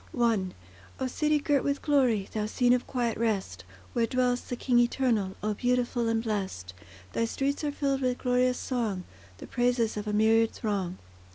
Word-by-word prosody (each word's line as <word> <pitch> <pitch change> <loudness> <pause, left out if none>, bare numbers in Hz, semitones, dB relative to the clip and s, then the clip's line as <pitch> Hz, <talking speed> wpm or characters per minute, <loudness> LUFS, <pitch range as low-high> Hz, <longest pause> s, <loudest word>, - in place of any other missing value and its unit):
I 225 -5 +3 0.5
O 260 - -1
city 300 +4 +1
girt 290 -2 +1
with 280 0 -1
glory! 255 -9 +2
Thou 215 -1 -1
scene 245 +2 +3
of 250 - 0
quiet 240 -4 -1
rest, 195 - -1 0.3
Where 235 -1 +2
dwells 250 -1 +1
the 245 - -5
King 245 0 +2
Eternal— 240 -5 +1
O 215 0 0
beautiful 245 +1 0
and 225 0 +1
blest! 190 - -3 0.4
Thy 230 - +1
streets 275 +5 -1
are 295 - 0
filled 275 -1 -1
with 250 -1 0
glorious 250 0 +2
song, 220 -8 -2 0.3
The - - -9
praises 245 -3 +1
of 210 0 -4
a - - 0
myriad 225 +1 +4
throng. 195 -5 -2
240 Hz, 175 wpm, -28 LUFS, 215-255 Hz, 0.5 s, myriad